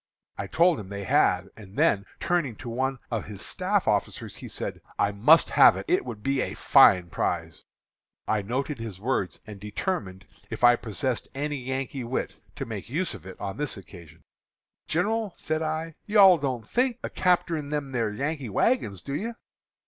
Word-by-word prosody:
I 100 - -5
told 170 - +3
him 95 -3 -8
they 100 0 -5
had; 95 0 +2
and 100 -2 -13
then, 100 -1 +3
turning 170 -10 0
to 120 - -8
one 130 +3 -1
of 115 -3 -2
his 100 -2 -9
staff - - -1
officers, - - -1
he - - -8
said, - - -5 0.2
'I 100 - +2
must 130 +12 +5
have - - +7
it; - - -5
it 360 +2 +2
would 105 -2 -7
be 135 -1 +1
a - - -3
fine 90 -2 +5
prize.' - - -2 0.6
"I 110 -1 +1
noted 130 +6 -3
his 110 -5 -6
words 100 -6 -2
and 105 -3 -9
determined, 100 - -4 0.2
if - - -6
I 120 0 +8
possessed 120 +2 -2
any 145 +1 -2
Yankee 130 0 -4
wit, 120 +2 -3 0.2
to - - -4
make 110 -1 -7
use 170 +8 -1
of 85 - -10
it 95 - -10
on 95 -1 -5
this 145 -5 -2
occasion. 90 -4 -13 0.6
"'Gin'ral,' 210 +4 0
said 155 0 -2
I, 160 +1 -2
'you 210 +1 +1
all 190 -4 +8
don't 130 -6 -3
think 250 -1 +1
of - - -5
capterin' 170 -5 +1
them 145 -3 -3
are 115 -3 +1
Yankee 140 +4 -3
wagons, 100 - +1
do 140 - -5
you?' 225 +10 -3
130 Hz, 185 wpm, -26 LUFS, 105-155 Hz, 0.6 s, I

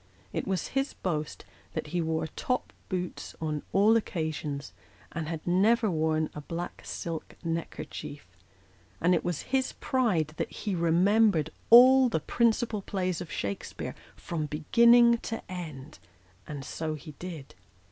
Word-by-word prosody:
It - - -2
was 190 -2 -1
his 270 +1 -1
boast 155 -4 -3 0.3
that - - -3
he 175 - +1
wore 160 0 -1
top 250 +10 -3 0.2
boots 180 -2 -4
on 155 -2 -2
all 210 +3 +5
occasions, 155 - -2 0.4
and 160 -1 -4
had 160 -1 -5
never 210 +5 +3
worn 155 -1 +1
a 150 - -6
black 170 +4 -5
silk 165 -2 -5
neckerchief; 165 -3 -5 0.7
and 175 +2 +3
it 170 - +1
was 175 -4 -2
his 260 -1 +2
pride 220 - +1
that - - -2
he 205 - -3
remembered 175 0 +3 0.2
all 255 +2 +9
the 160 - 0
principal 225 +3 +1
plays 185 -3 -2
of 175 - -7
Shakspcare 100 -1 -4 0.2
from 155 -3 -4
beginning 235 - +5
to 225 -1 -5
end 155 -6 -7 0.5
and 145 -3 -6
so 155 0 -3
ho 155 +1 -10
did. 165 -6 -7
170 Hz, 140 wpm, -29 LUFS, 155-220 Hz, 0.7 s, all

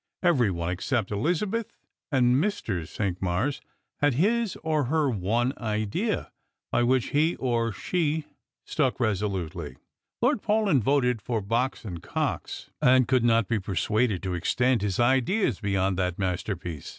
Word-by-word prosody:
Every 140 - +4
one, 85 -1 -2
except 105 +4 -1
Elizabeth 180 - -1 0.4
and 125 -3 +4
Mr. 115 - -1
Cinqmars, 95 - -1 0.4
had 145 -3 +2
his 215 - +1
or 155 -3 +1
her 150 +1 +1
one 115 +5 0
idea, 110 -2 -2 0.4
by - - +2
which 125 0 +2
he 155 +4 +2
or 115 -3 0
she 155 - -1 0.4
stuck 135 -6 0
resolutely. 95 - -2 0.4
Lord 245 -2 +2
Paulyn 210 - +2
voted 125 -2 +2
for 115 +2 -1
Box 115 +5 -1
and 85 -5 -6
Cox, - - -3
and 130 0 +5
could 130 -2 +3
not 115 -2 +3
be 115 -2 0
persuaded 100 +2 0
to 95 -1 -2
extend 120 +7 +1
his 100 -3 -1
ideas 130 - +2
beyond 95 -2 0
that 90 -2 -1
masterpi'^ce. 90 -4 -3
120 Hz, 140 wpm, -26 LUFS, 95-145 Hz, 0.4 s, and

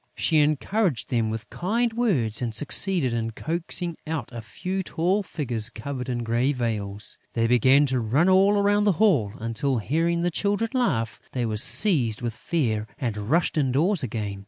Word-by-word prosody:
She 155 - +1
encouraged 155 - 0
them 115 -3 0
with 110 +1 -5
kind 225 +6 -1
words 140 - 0
and 115 -3 -3
succeeded 150 - +2
in 115 -1 -3
coaxing 170 - -3
out 155 -7 -4
a 120 -1 -7
few 185 - -4
tall 185 +3 0
figures 125 - -3
covered 130 -1 -6
with 120 -1 -2
grey 120 +5 0
veils. 105 -5 -2
They 115 -1 0
began 130 +4 +4
to 130 -2 -1
run 125 +10 +1
all 195 +2 +4
around 205 +1 +2
the 205 - +3
hall 150 - +2
until, 115 +4 -1
hearing 165 +9 0
the 175 +1 0
Children 205 +6 -1
laugh, 135 - -1
they 125 -2 -1
were 110 -1 -2
seized 120 - +4
with 120 -1 -2
fear 110 -6 -2
and 105 -4 -4
rushed 165 0 +1
indoors 150 +8 +1
again. 105 -5 -4
135 Hz, 170 wpm, -24 LUFS, 115-180 Hz, -, began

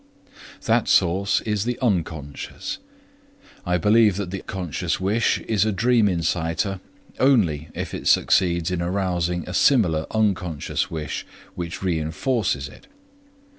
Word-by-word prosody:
That - - +2
source 95 +3 +3
is 105 -2 -1
the 120 +1 -2
unconscious. 85 - -3 0.9
I 90 0 +2
believe 105 +2 +4
that 100 -3 -4
the 95 - -3
conscious 90 -5 -3
wish 105 +5 +1
is 105 -4 +1
a 110 - +1
dream 115 +2 +3
inciter 85 +2 -1 0.4
only 90 - +2
if - - -4
it - - -4
succeeds 85 -1 +3
in 90 -1 -1
arousing 90 -2 -1
a 90 - -5
similar 90 - +3
unconscious 95 -8 -1
wish 75 -3 -4 0.3
which 85 +2 -6
reinforces 80 - -1
it. 275 - -16
90 Hz, 125 wpm, -23 LUFS, 85-105 Hz, 0.9 s, believe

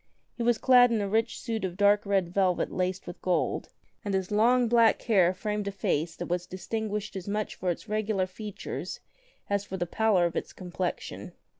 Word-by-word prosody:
He - - -6
was 235 -1 +3
clad 245 0 +6
in 225 - +1
a 200 - -1
rich 225 +3 0
suit 225 -3 -3
of 185 -1 -3
dark 205 0 +4
red 190 -3 +1
velvet 185 -2 +1
laced 185 0 -2
with 175 - -9
gold, 180 -2 0 0.3
and 200 -2 -1
his 190 0 -2
long 240 +4 +4
black 230 -1 +4
hair 190 -7 +4
framed 210 +1 -3
a - - -1
face 165 -4 -1
that - - -5
was 175 0 -2
distinguished 210 +2 -4
as 190 -1 -6
much 210 +1 -2
for 180 - -3
its 175 +5 -3
regular 215 -2 0
features 205 +2 -6 0.5
as 200 0 0
for 190 -1 -6
the 175 - -1
pallor 200 0 +2
of 170 - -2
its - - -3
complexion. 180 -1 -5
200 Hz, 195 wpm, -28 LUFS, 185-220 Hz, 0.5 s, clad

